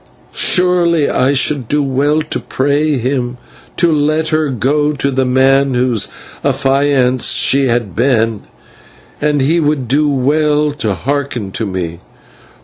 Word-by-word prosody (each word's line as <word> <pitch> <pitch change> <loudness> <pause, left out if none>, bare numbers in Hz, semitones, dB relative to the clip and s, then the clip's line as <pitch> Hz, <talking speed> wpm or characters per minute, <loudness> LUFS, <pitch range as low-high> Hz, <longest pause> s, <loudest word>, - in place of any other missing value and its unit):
Surely 175 -4 +2
I 130 +2 +1
should 140 -2 0
do 150 +3 0
well 145 +3 0
to 155 - -4
pray 145 +2 0
him 125 0 -2 0.4
to 170 -1 +2
let 155 +1 0
her 155 -2 0
go 145 +4 0
to 140 -1 -2
the 130 0 0
man 135 +1 +2
whose 125 -3 +1 0.4
affianced 135 -2 +1
she 135 0 +2
had 115 -6 -1
been, 115 -4 +1 0.8
and 150 -1 +1
he 160 +6 +2
would 145 -5 -1
do 145 +4 +1
well 150 +2 +1
to 110 -9 -3
hearken 130 -3 -3
to 110 +2 -3
me. 85 -3 -5
140 Hz, 140 wpm, -14 LUFS, 125-150 Hz, 0.8 s, Surely